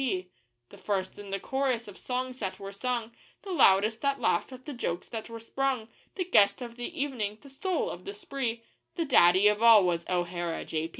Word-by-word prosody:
P. 190 -8 -1 0.4
The - - -14
first 195 -2 -2
in 205 -1 -9
the 195 0 -2
chorus 260 -3 -1
of 205 - -10
songs 255 0 -4
that 190 -3 -3
were 195 0 -7
sung, 235 +2 -2 0.3
The 390 - -6
loudest 220 - +4
that 280 -1 0
laughed - - +1
at 255 0 -11
the 295 - -5
jokes 175 -8 -3
that 225 0 -6
were 230 0 -7
sprung, 250 0 -2 0.3
The 370 - -1
guest 210 - +4
of 240 -2 -7
the 245 +3 -6
evening, 230 -7 -2
the 280 - -14
soul 360 +6 -1
of - - -9
the 400 +1 -6
spree 270 - -4 0.3
The 335 - -1
daddy 190 - +6
of 210 +1 +2
all 225 -4 +8
was 170 -1 -1
O'Hara, 175 -1 -2
J. 160 0 -2
230 Hz, 205 wpm, -29 LUFS, 195-265 Hz, 0.4 s, all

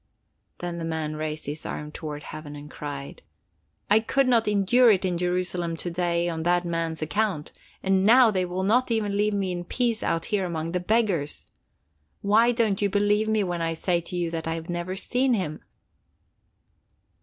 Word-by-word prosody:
Then 175 -1 -5
the - - -4
man 160 -2 -3
raised 155 0 -4
his 150 +2 -4
arms 150 0 -5
toward 150 -2 -6
heaven 150 -1 -8
and 145 +1 -10
cried: 140 -2 -7 0.7
"I 210 +2 +5
could 270 +4 +1
not 230 -3 +3
endure 210 +5 +4
it 195 -3 +3
in 180 -2 0
Jerusalem 180 -1 -1
to 175 - -4
day 170 0 0
on 165 -2 -2
that 175 +1 +2
man's 165 -2 -2
account, 190 -2 -1 0.3
and 190 0 +2
now 235 +2 +7
they 185 -2 0
will 180 +1 -3
not 245 +7 +3
even 215 -3 0
leave 210 0 +1
me 195 -2 -1
in 175 -1 -3
peace 235 +4 0
out 165 0 -1
here 200 -2 +2
among 165 -2 -3
the 180 - 0
beggars! 185 -6 0 0.7
Why 220 +4 +4
don't 225 -5 +1
you 200 - +2
believe 205 +2 +2
me 220 -1 +2
when 175 -2 -2
I 165 0 -1
say 175 +1 0
to 170 +2 -8
you 170 -2 -1
that 165 -1 -4
I 165 - -1
have 165 +1 -6
never 175 +2 -3
seen 250 +5 +1
him?" 155 -7 -3
180 Hz, 190 wpm, -26 LUFS, 165-210 Hz, 0.7 s, now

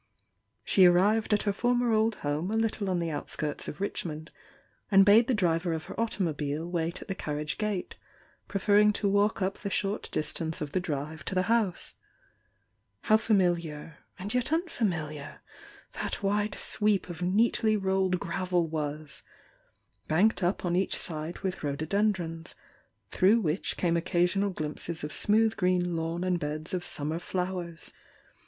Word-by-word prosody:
She 185 -2 +6
arrived 205 +6 +3
at 210 - +3
her 205 - 0
former 245 +2 +1
old 220 0 +2
home 150 +5 -1
a 220 - 0
little 220 -3 0
on 185 - +1
the 170 -1 -2
outskirts 150 0 -3
of 150 - -6
Richmond, 160 -5 -4 0.6
and 195 -2 +6
bade 215 +3 +6
the 255 - +2
driver 170 -3 +1
of 160 -1 -3
her 175 - -8
automobile 160 -8 -1
wait 170 0 -2
at - - -21
the 195 - -2
carriage 150 -3 -4
gate, 210 -4 -3 0.5
preferring 205 +1 +3
to 205 - 0
walk 205 0 +2
up 190 +1 -2
the 200 - -4
short 200 +1 -2
distance 160 +1 -1
of 150 -2 -4
the 185 - +1
drive 155 -1 -4
to 195 - -2
the 185 - +2
house. 225 -4 0 1.1
How 215 - +4
familiar 170 -8 0 0.2
and 200 +3 -4
yet 250 +3 0
unfamiliar 175 - -2 0.5
that - - -4
wide 205 +1 0
sweep 210 -2 +1
of 175 -1 -8
neatly 215 +3 +2
roUed 190 -1 +1
gravel 180 0 0
was! 150 -2 -4 0.9
banked 185 +5 +3
up 180 +1 0
on 175 0 +1
each 190 +2 +1
side 160 +1 -4
with 190 -3 -3
rhododendrons, 165 +3 -1 0.6
through 200 +5 +4
which 165 -3 -1
came 170 -2 +1
occasional 180 +3 +1
glimpses 160 -1 -4
of 150 - -3
smooth 220 +1 +4
green 180 -2 +1
lawn 165 +2 -2
and 180 -1 0
beds 155 +4 -5
of 180 -1 -1
summer 155 +1 -1
flowers! 180 -2 -4
180 Hz, 155 wpm, -28 LUFS, 160-205 Hz, 1.1 s, She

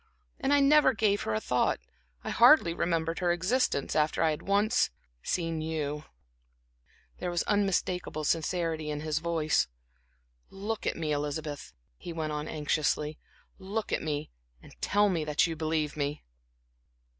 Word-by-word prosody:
And 270 - 0
I 285 0 +5
never 290 -1 +5
gave 210 -3 +1
her 110 - -2
a - - +1
thought, 125 +2 +1 0.4
I - - -3
hardly 240 - +6
remembered 165 -1 -1
her 175 -2 +2
existence, 185 - 0
after 155 +1 +2
I 160 - +3
had 150 - -4
once 205 +4 +2 0.3
seen 165 - -2
you." 150 -2 -3 1.1
There - - -2
was 175 -1 0
unmistakable 185 -5 0
sincerity 165 0 -1
in 150 0 -3
his 155 0 -1
voice. 160 - +1 0.8
"Look 205 +3 -4
at - - -1
me, 160 -2 -2
Elizabeth," 145 0 -3 0.3
he 170 - -7
went 160 -2 -3
on 150 0 -3
anxiously, 150 0 -1 0.4
"look 205 +3 -4
at - - 0
me, 150 -1 -3 0.3
and - - -16
tell 205 +1 +3
me 175 -5 0
that 150 0 +2
you 165 -2 -3
believe 155 -1 -1
me." 145 0 -3
165 Hz, 150 wpm, -29 LUFS, 150-195 Hz, 1.1 s, hardly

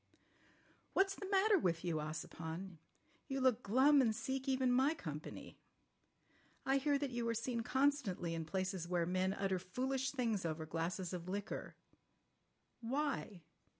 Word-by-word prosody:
"What's 390 0 +3
the 390 -1 -7
matter 400 0 +5
with 170 - 0
you, 165 -2 0
Ossipon? 160 +3 -5 0.5
You 270 -1 -2
look 255 -3 +3
glum 270 +7 +5
and 225 -4 +2
seek 265 +3 -3
even 260 -1 +2
my 265 +5 +4
company. 155 - -7 1.1
I 270 +1 +3
hear 285 +1 +2
that 280 -2 -2
you 240 -1 -1
are 230 - 0
seen 235 +1 -1
constantly 250 -10 +1
in 165 -1 -3
places 185 0 -2
where 175 -1 +1
men 185 +2 +1
utter 195 -2 0
foolish 260 +8 -1
things 230 -8 0
over 160 -1 -2
glasses 170 +3 -2
of 175 0 -5
liquor. 205 +2 -4 1.0
Why? 250 - -2
220 Hz, 145 wpm, -37 LUFS, 180-265 Hz, 1.1 s, matter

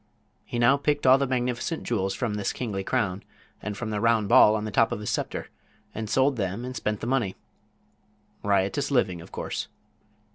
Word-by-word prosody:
He - - -5
now 120 +4 +5
picked 145 0 0
all 130 +1 +7
the 140 - +1
magnificent 125 +5 -2
jewels 95 -5 -1
from 120 -4 -2
this 105 -1 -2
kingly 105 -6 -3
crown 100 -5 -1 0.4
and 105 -1 -5
from 110 -2 -4
the 105 -1 -2
round 115 -3 +2
ball 105 - +7
on 110 0 -2
the 110 - -4
top 115 +3 +3
of - - -2
his 105 - -3
scepter, - - -3 0.4
and 110 -1 -5
sold 135 +1 +2
them 100 +3 -2
and 130 0 -6
spent 105 -4 -2
the - - -3
money. 120 -6 0 1.1
Riotous 100 +7 +1
living, 95 - +1
of - - -13
course. - - -4
110 Hz, 190 wpm, -26 LUFS, 100-130 Hz, 1.1 s, all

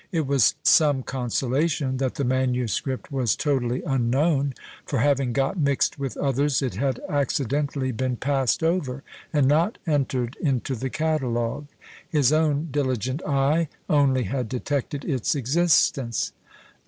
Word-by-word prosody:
It 165 -5 0
was 135 -5 +3
some 145 -5 +4
consolation 130 +3 -1
that 130 -1 -1
the 140 - -2
manuscript 130 0 -1
was 130 -5 +1
totally 130 -4 -1
unknown 135 +2 +1 0.3
for 140 - -3
having 135 0 +2
got 135 +7 0
mixed 140 -1 +1
with 135 -2 -4
others, 140 0 +1
it 130 - -2
had 130 +4 -1
accidentally 140 -1 -1
been 125 +1 -2
passed 135 +2 0
over, 150 -6 -1 0.3
and 145 -4 +3
not 165 - +2
entered 135 -5 -1
into 135 -3 0
the 130 +3 -3
catalogue; 135 -3 -1 0.4
his 145 -3 +3
own 155 0 +1
diligent 130 -1 -1
eye 145 +3 +2 0.2
only 135 -4 +3
had 125 -3 -3
detected 140 +3 -3
its 135 -3 0
existence. 135 -4 +1
135 Hz, 130 wpm, -24 LUFS, 130-145 Hz, 0.4 s, some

